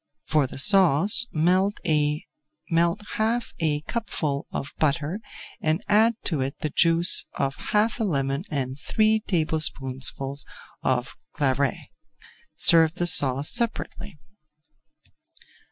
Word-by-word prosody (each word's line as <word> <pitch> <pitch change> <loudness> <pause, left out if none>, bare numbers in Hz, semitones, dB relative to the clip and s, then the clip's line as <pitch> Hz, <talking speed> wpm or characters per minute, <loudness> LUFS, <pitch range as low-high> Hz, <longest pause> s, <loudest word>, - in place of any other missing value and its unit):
For 150 -3 +1
the - - -10
sauce, 195 - +6
melt 185 +6 0
half 195 - -2
a 150 -3 -1
cupful 155 -9 -4
of 140 - -6
butter 155 +5 -1 0.4
and 160 +5 -1
add 220 +3 +3
to 155 -7 0
it 135 +1 -4
the 155 -3 -3
juice 170 +3 +2
of 135 -1 -2
half 215 +3 0
a - - -1
lemon 140 -5 -2
and 135 -2 -4
three 215 +8 +1
tablespoonfuls 140 -6 -3 0.4
of 130 -1 -2 0.2
Claret. 140 -2 0 0.8
Serve 165 0 +4
the 175 - -2
sauce 140 -4 +5
separately. 205 -6 -3
160 Hz, 105 wpm, -24 LUFS, 140-205 Hz, 0.8 s, sauce